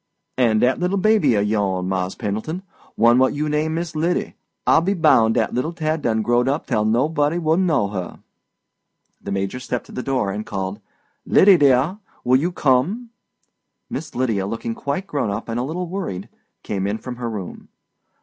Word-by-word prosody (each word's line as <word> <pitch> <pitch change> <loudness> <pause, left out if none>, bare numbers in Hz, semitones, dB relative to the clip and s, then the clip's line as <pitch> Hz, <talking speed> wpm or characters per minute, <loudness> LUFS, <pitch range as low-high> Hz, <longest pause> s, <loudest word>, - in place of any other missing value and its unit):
"And 115 -4 +3
dat 130 +1 +2
little 180 +3 0
baby 215 - +3
of 100 0 +2
yo'n, 95 -4 0
Mars' 95 0 -2
Pendleton—one 120 - -1
what 130 +2 +3
you 150 +1 -1
name 155 +1 0
Miss 170 -1 -4
Lyddy—I 165 0 0
be 190 +5 0
bound 115 -10 +4
dat - - +1
little 130 +8 -1
tad 155 -1 -1
done 110 -3 0
growed 120 +2 +2
up 140 +4 0
tell 110 -5 0
nobody 145 +7 +1
wouldn't 170 +2 +2
know 140 - +1
her." 95 -4 -5 1.0
The 100 - -6
Major 100 +5 -2
stepped 125 -1 -4
to - - -15
the 125 - -4
door 125 -7 -1
and 105 +2 -4
called: 95 0 -4 0.4
"Lydie, 195 -1 +6
dear, 145 +6 +3 0.2
will 125 +1 +4
you 170 +5 -1
come?" 175 - +1 0.8
Miss 160 - -5
Lydia, 110 -7 0
looking 115 +2 -3
quite 140 +10 -3
grown 145 - -2
up 100 +2 -4
and 115 +1 -2
a - - -1
little 170 +7 -3
worried, 170 - -5 0.3
came 100 -1 -2
in 105 +2 -1
from 125 +1 -7
her 120 -1 -3
room. 100 -5 -7
125 Hz, 180 wpm, -21 LUFS, 110-160 Hz, 1.0 s, Lydie